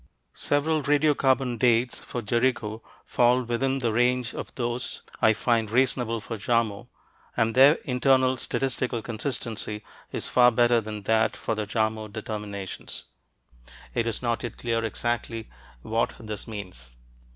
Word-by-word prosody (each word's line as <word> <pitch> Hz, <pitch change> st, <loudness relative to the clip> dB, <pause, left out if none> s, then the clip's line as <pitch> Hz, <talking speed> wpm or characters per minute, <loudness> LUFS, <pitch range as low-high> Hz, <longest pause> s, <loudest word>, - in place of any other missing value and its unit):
Several 155 Hz, +2 st, +1 dB
radiocarbon 135 Hz, -4 st, +2 dB
"dates" 120 Hz, 0 st, +3 dB
for 120 Hz, -, -6 dB
Jericho 120 Hz, -1 st, 0 dB, 0.2 s
fall 125 Hz, +1 st, +3 dB
within 130 Hz, +3 st, 0 dB
the 120 Hz, -4 st, 0 dB
range 125 Hz, +1 st, +2 dB
of -, -, -6 dB
those 120 Hz, 0 st, -2 dB, 0.2 s
I 110 Hz, -, +6 dB
find 115 Hz, -1 st, +1 dB
reasonable 120 Hz, -1 st, +1 dB
for 115 Hz, +1 st, -6 dB
Jarmo, 110 Hz, -2 st, 0 dB, 0.5 s
and 115 Hz, 0 st, +2 dB
their 135 Hz, +5 st, +7 dB
internal 130 Hz, 0 st, +3 dB
statistical 125 Hz, -3 st, -2 dB
consistency 110 Hz, -3 st, -4 dB, 0.3 s
is -, -, -2 dB
far 125 Hz, -1 st, +6 dB
better 120 Hz, 0 st, +3 dB
than 105 Hz, -1 st, -6 dB
that 110 Hz, +2 st, +2 dB
for -, -, -2 dB
the 105 Hz, -1 st, -3 dB
Jarmo 110 Hz, 0 st, -1 dB
determinations. 105 Hz, -3 st, -6 dB, 0.9 s
It 115 Hz, -1 st, 0 dB
is 115 Hz, +1 st, -3 dB
not 120 Hz, -1 st, 0 dB
yet 120 Hz, -, -6 dB
clear 115 Hz, -1 st, -1 dB
exactly 115 Hz, 0 st, -2 dB, 0.3 s
what 115 Hz, +1 st, 0 dB
this 110 Hz, -2 st, -6 dB
means. 90 Hz, -, -8 dB
115 Hz, 135 wpm, -26 LUFS, 110-125 Hz, 0.9 s, their